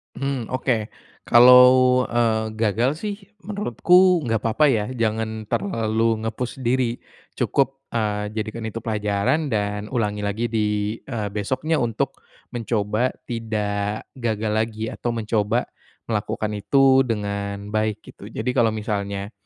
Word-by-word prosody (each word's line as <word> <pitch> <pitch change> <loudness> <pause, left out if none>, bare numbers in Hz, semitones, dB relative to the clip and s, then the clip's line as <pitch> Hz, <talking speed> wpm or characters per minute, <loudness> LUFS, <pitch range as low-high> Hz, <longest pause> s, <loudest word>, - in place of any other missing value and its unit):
Mhm, 135 -2 -2
oke. 120 -4 -1 0.3
Kalau, 125 +1 +7
eee, 115 -2 +1
gagal 110 +3 +1
sih 210 -1 -3 0.3
menurutku 180 - +3
enggak 115 -5 -1
apa-apa 115 +7 +3
ya, 110 -5 +1
jangan 110 -2 -2
terlalu 115 - 0
nge-push 120 +3 -4
diri, 120 -1 0 0.3
cukup, 135 0 0
eee, 105 -2 -1
jadikan 110 +1 -4
itu 110 - -6
pelajaran 105 +7 0
dan 105 -1 -2
ulangi 105 -5 -1
lagi 105 +3 -2
di, 105 0 -1
eee, 110 -6 -4
besoknya 130 +10 -1
untuk 120 +4 -2 0.3
mencoba 115 0 0 0.2
tidak 105 -3 -3
gagal 110 -4 -2
lagi, 110 0 -1
atau 120 - -3
mencoba 105 -2 0 0.4
melakukan 110 -1 -2
itu 130 +6 +4
dengan 100 -2 -3
baik, 110 -1 -1
gitu. - - -11
Jadi 115 +3 -2
kalau 120 -3 +3
misalnya, 100 -2 -3
110 Hz, 125 wpm, -23 LUFS, 105-125 Hz, 0.4 s, Kalau